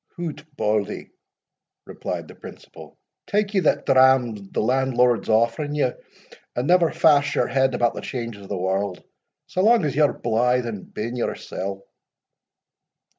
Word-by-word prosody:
"Hout, 170 -4 -5
Bauldie," 105 -1 -1 0.7
replied - - -5
the - - -12
principal, - - -13 0.3
"tak 210 0 0
ye 195 - +3
that 155 - +1
dram 130 -2 +4 0.2
the - - -3
landlord's 125 0 +1
offering 115 +7 +1
ye, 140 -4 +1 0.6
and 125 +3 -1
never 175 -2 +4
fash 145 -2 +3
your - - +2
head 130 +1 +1
about 120 - +1
the - - -6
changes 115 -5 -6
o' 100 - -11
the 100 - -3
warld, 95 +1 -2 0.4
sae 185 - -2
lang 225 -2 +4
as 140 - -2
ye're 150 -1 +4
blithe 125 +2 0
and 105 -5 -7
bien 115 +3 -4
yoursell." 100 -4 -4
125 Hz, 145 wpm, -23 LUFS, 110-145 Hz, 0.7 s, dram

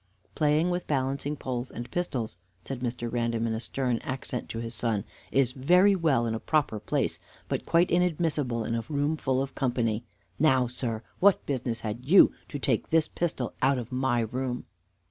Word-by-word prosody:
"Playing 155 +3 +2
with 175 0 -2
balancing 140 +1 -1
poles 125 -2 -4
and 120 +1 -7
pistols," 125 - -2 0.3
said 135 -2 -5
Mr. 120 -1 -3
Random 115 -1 0
in 115 - 0
a 110 - -2
stern 125 0 -1
accent 130 -1 -5
to - - -5
his 115 0 -4
son, 110 -2 0 0.3
"is 135 -2 +3
very 180 +10 +4
well 155 -9 +2
in 115 - -1
a 115 - -2
proper 145 -8 +1
place, - - -1 0.3
but - - -3
quite 170 +2 +3
inadmissible 155 -9 +1
in 115 - -2
a 115 0 -1
room 145 +1 +1
full 135 -3 0
of 135 - -7
company. 120 -4 0 0.4
Now, 130 -4 +4
sir, 120 -2 -3 0.2
what 200 0 +4
business 125 -4 -2
had 110 +3 -4
you 185 +5 +8 0.2
to 145 - -4
take 130 -4 0
this 160 -1 +3
pistol 155 -8 -2
out 135 +1 +3
of 120 0 -5
my 125 -2 +1
room?" 125 +2 -3
130 Hz, 185 wpm, -28 LUFS, 115-150 Hz, 0.4 s, you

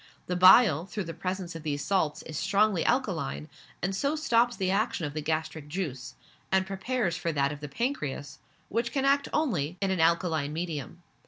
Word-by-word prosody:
The 180 - -2
bile, 185 - +7
through 205 0 -4
the 165 -1 -6
presence 185 0 -4
of 165 - -6
these 145 -2 -3
salts, 160 -6 0
is 155 - -8
strongly 200 -1 +2
alkaline, 70 +3 -1 0.4
and 190 +2 0
so 280 +9 0
stops 240 -5 +2
the 185 -2 0
action 200 -3 0
of 145 - -5
the 155 - -3
gastric 155 -1 -3
juice, 145 -7 -5 0.4
and 190 0 +3
prepares 195 -1 -1
for 170 - -1
that 140 -1 +1
of 150 - -7
the 150 -1 -7
pancreas, 145 - -3 0.3
which 235 +2 -1
can 275 -1 0
act 280 +1 +3
only 180 - 0
in 195 -1 0
an 190 - 0
alkaline 160 -3 +2
medium. 165 0 -5
175 Hz, 185 wpm, -28 LUFS, 155-200 Hz, 0.4 s, bile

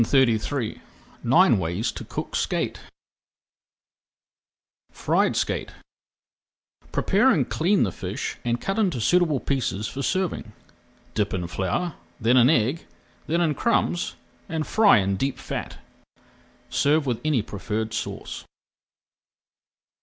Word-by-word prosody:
[Page 115 - +2
363] 125 -2 +1 0.4
NINE - - +5
WAYS 85 +6 -1
TO - - -8
COOK - - -5
SKATE - - -1 2.1
FRIED - - +1
SKATE - - -1 1.2
Prepare 210 +7 +3
and 155 - +2
clean 185 +5 +2
the 95 - 0
fish - - -5
and 120 0 0
cut 195 - -2
into 185 - +1
suitable 160 +3 +3
pieces 120 -7 -1
for 140 - -5
serving. 175 - -1 0.6
Dip 105 -2 0
in 90 -2 -2
flour, 95 - -2 0.3
then 115 +2 +3
in 125 0 +6
egg, 135 +2 +1 0.4
then 170 +2 +1
in 160 -3 +2
crumbs, 175 -3 0 0.3
and 160 -2 -2
fry 215 - +5
in 95 -1 +1
deep 135 +6 -1
fat. - - -5 0.9
Serve 150 +1 +2
with 125 -4 -1
any 150 -8 +1
preferred 110 +2 -4
sauce. 110 - -5
130 Hz, 120 wpm, -25 LUFS, 110-165 Hz, 2.1 s, in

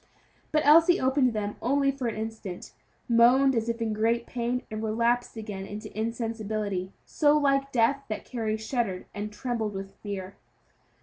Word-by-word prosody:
But 305 -2 +2
Elsie 330 +4 +7
opened 260 -1 +2
them 210 -1 -3
only 275 +2 +2
for 265 -3 -4
an 225 - -2
instant, 220 -4 -6 0.3
moaned 250 +3 +5
as 230 0 0
if 230 0 -1
in 220 -1 -1
great 230 +2 +1
pain, 245 +1 -2
and 215 0 -4
relapsed 235 +2 0
again 205 -3 -6
into 210 +1 -8
insensibility, 215 -4 -2
so 295 -1 +3
like 275 -1 +2
death 260 +4 +2
that 215 - -4
Carry 220 -3 -2
shuddered 220 -4 -2
and 205 +1 -4
trembled 220 -2 -3
with 195 0 -6
fear. 195 -2 -6
230 Hz, 160 wpm, -27 LUFS, 215-255 Hz, 0.3 s, Elsie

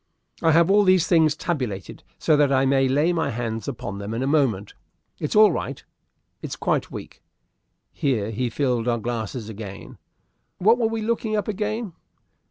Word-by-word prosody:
"I 165 - +4
have 170 +3 +4
all 205 +1 +5
these 185 -3 +4
things 160 -3 +3
tabulated, 125 - -4 0.2
so 155 - +3
that 145 -2 +3
I 135 0 +3
may 135 0 +3
lay 145 +6 +2
my 165 -1 0
hands 115 -2 -4
upon 100 0 -5
them 100 +2 -5
in 120 - -2
a - - 0
moment. 135 -9 +1 0.5
It's 150 - -3
all 215 0 +7
right - - -4 0.6
it's - - -5
quite - - -1
weak" - - -9 0.7
(here 120 - -1
he 120 +3 -2
filled 125 -2 -1
our 120 -1 +2
glasses 115 0 -4
again). 105 -3 -9 0.6
"What 225 +6 +4
were 230 - +2
we 225 0 -3
looking 225 -1 -1
up, 210 - -1
again?" 215 -1 -3
140 Hz, 175 wpm, -23 LUFS, 115-180 Hz, 0.7 s, all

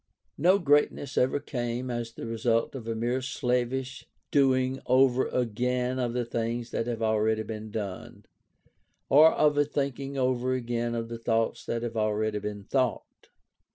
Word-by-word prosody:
No 180 +6 +5
greatness 145 -4 +1
ever 130 +3 +2
came 125 -2 -3
as 120 -1 -4
the - - -7
result 115 0 0
of 125 -5 -7
a 115 - -2
mere 120 +3 -1
slavish 125 0 -2 0.2
doing 130 -2 +2
over 130 0 +4
again 125 +2 -1
of 120 -2 -1
the 125 -1 -1
things 115 +1 -3
that 115 - -2
have 115 -2 -2
already 110 0 +1
been 110 0 -6
done, 100 -3 -6 0.8
or 155 +3 +8
of 150 -1 +2
a - - +6
thinking 140 -1 -3
over 130 -1 +1
again 120 -1 -2
of 115 -1 -3
the 115 0 -6
thoughts 115 -1 0
that 115 0 -2
have 115 -1 -4
already 110 0 0
been 105 0 -5
thought. 130 +3 -2
120 Hz, 155 wpm, -28 LUFS, 115-130 Hz, 0.8 s, or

